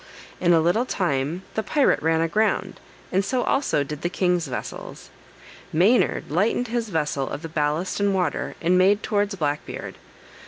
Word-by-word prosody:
In 175 - +3
a 165 - +6
little 210 +10 +1
time 165 - -1
the 220 - 0
pirate 285 +4 +2
ran 160 +1 +2
aground, 210 +7 0 0.3
and 190 +2 +2
so 250 +4 0
also 270 - +1
did 150 +1 -7
the 175 - -1
king's 180 -3 0
vessels. 125 -2 -7 0.6
Maynard 190 - +2
lightened 220 +8 +1
his 230 -1 -2
vessel 150 -6 -1
of 150 - -6
the - - -4
ballast 155 +4 -1
and 200 0 +2
water, 180 -5 -1
and 180 +2 +3
made 200 +3 +4
towards 205 -2 0
Black 150 -4 -1
Beard. - - -7
180 Hz, 165 wpm, -24 LUFS, 160-205 Hz, 0.6 s, a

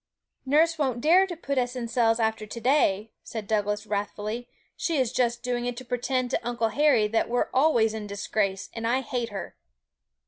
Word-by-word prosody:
'Nurse 320 +3 +3
won't 260 -5 0
dare 350 +8 +5
to 350 - -5
put 280 -4 -1
us 245 0 -1
in 240 -2 -3
cells 230 -1 +2
after 220 -1 0
to 235 - -7
day,' 225 -5 +2
said 220 -2 -6
Douglas 210 0 -1
wrathfully; 210 +3 -3 0.3
'she 330 -3 -1
is 255 -4 +1
just 240 -1 0
doing 245 -1 -1
it 245 -1 -3
to 255 - -8
pretend 250 +1 -1
to - - +1
Uncle 235 -2 -1
Harry 285 -6 +3
that 225 +2 0
we're 245 +1 0
always 255 -6 +3
in 215 -1 -5
disgrace; 200 -1 -2
and 230 0 -3
I 255 +3 +2
hate 240 -2 -3
her!' - - -7
240 Hz, 195 wpm, -26 LUFS, 220-260 Hz, 0.3 s, dare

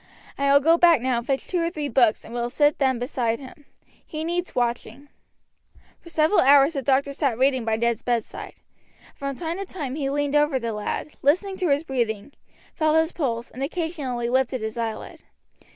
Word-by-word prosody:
I 280 0 +1
will 280 - +7
go 325 +4 +4
back 340 -4 +6
now 250 0 0
and 235 - -10
fetch 270 -1 -1
two 355 -2 -1
or 335 - 0
three 305 -4 -4
books 240 -6 +2
and - - -10
will 240 0 -2
then 265 -3 +1
sit 270 - -8
by 230 -2 +2
him. 275 +3 -13 0.4
He 310 0 -6
needs 345 +2 -3
watching." 240 +3 -2 0.9
For 335 - -14
several 320 +4 +3
hours 280 +3 +6
the 275 - -2
doctor 275 +2 +1
sat 275 -5 0
reading 260 -1 +2
by 225 -1 +1
Ned's 235 0 0
bedside. 240 -3 -3 0.6
From 275 -1 -5
time 330 +4 -4
to 395 - -4
time 300 -9 -5
he 280 -2 -2
leaned 290 0 -1
over 295 -2 +3
the 230 -3 -3
lad, 210 +7 -3
listened 375 +7 +1
to 360 -4 0
his 285 +2 +2
breathing, 240 -4 -2 0.4
felt 310 -1 +1
his 320 +1 +2
pulse, 235 -7 -3
and 260 - -9
occasionally 280 -6 -3
lifted 255 0 0
his 220 0 -4
eyelid. 225 -2 -5
275 Hz, 195 wpm, -24 LUFS, 240-310 Hz, 0.9 s, will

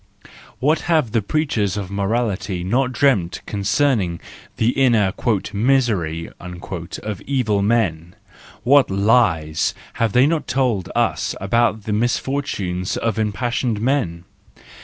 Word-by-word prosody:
What 150 +5 +2
have 155 -9 +2
the 115 -1 +1
preachers 105 - -1
of 100 -2 -5
morality 100 -2 -1
not 125 +7 +1
dreamt 120 -11 +1
concerning 100 - 0 0.4
the 115 - +2
inner 120 -7 +3 0.2
" 100 +2 -4
misery 100 -9 +1
" - - -40
of 90 +2 -6
evil 115 -7 +1
men! 90 -6 0 0.5
What 140 +4 +5
lies 95 -7 +2 0.2
have 115 -2 0
they 125 +2 +5
not 160 +1 0
told 125 -9 0
us - - 0
about 110 +2 +1
the 105 - -2
misfortunes 105 -6 -1
of 115 -1 -1
impassioned 110 +2 -1
men 110 -9 -1
110 Hz, 120 wpm, -20 LUFS, 95-125 Hz, 0.5 s, What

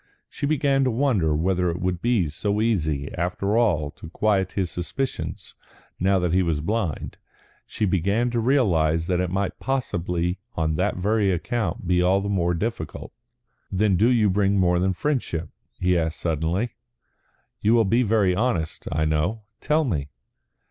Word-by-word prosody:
She 140 - -3
began 140 -2 +2
to - - +2
wonder 110 - +1
whether 90 +3 +1
it 85 +1 -3
would 90 -1 -2
be 115 -8 +2
so 100 +8 -2
easy 80 -11 0
after 90 +4 -1
all 85 -11 +2
to 80 - -11
quiet 95 0 +1
his 95 -4 -1
suspicions 130 +10 -4 0.5
now 95 +2 +3
that 90 -2 0
he 95 - +4
was 85 -4 0
blind; 95 -1 -2 0.5
she 105 - -1
began 100 +6 +1
to 120 - 0
realise 85 - +2
that 90 0 0
it 90 -1 0
might 95 +1 -2
possibly 90 -9 -1 0.2
on 80 -1 0
that 90 +6 0
very 100 +1 +2
account 95 0 -2
be 90 0 +2
all 95 +2 +3
the 100 +1 -3
more 90 -3 +1
difficult. 110 +7 -4 0.6
"Then 100 0 +2
do 110 +7 +4
you 115 -4 +3
bring 100 +1 +2
more 90 -2 +3
than 95 +1 +1
friendship?" 90 - -2 0.3
he 90 0 +2
asked 80 -1 -1
suddenly. 85 +8 -1 0.9
"You 110 +3 +4
will 115 -2 +4
be 115 +6 +3
very 105 -5 +2
honest, 95 -9 -1
I 80 +1 +1
know. 80 +9 0 0.2
Tell 155 +1 +2
me." 75 - -2
95 Hz, 165 wpm, -24 LUFS, 85-110 Hz, 0.9 s, he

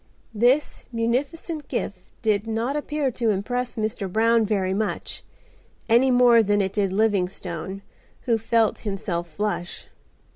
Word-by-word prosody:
This 245 +7 +2
munificent 275 +7 -2
gift 200 -2 -3 0.2
did 215 -1 +1
not 225 +5 -1
appear 295 -2 -1
to 230 -1 0
impress 245 +5 -1
Mr. 215 -3 -2
Brown 225 +1 +3
very 190 -3 0
much, 215 +2 -3 0.7
any 240 +3 +5
more 245 -2 +6
than 205 -1 +2
it 190 -1 0
did 200 -2 +1
Livingstone, 190 -2 -1 0.4
who 230 -3 +1
felt 225 0 +2
himself 185 -4 -3
flush. 200 -2 -3
220 Hz, 130 wpm, -24 LUFS, 200-245 Hz, 0.7 s, more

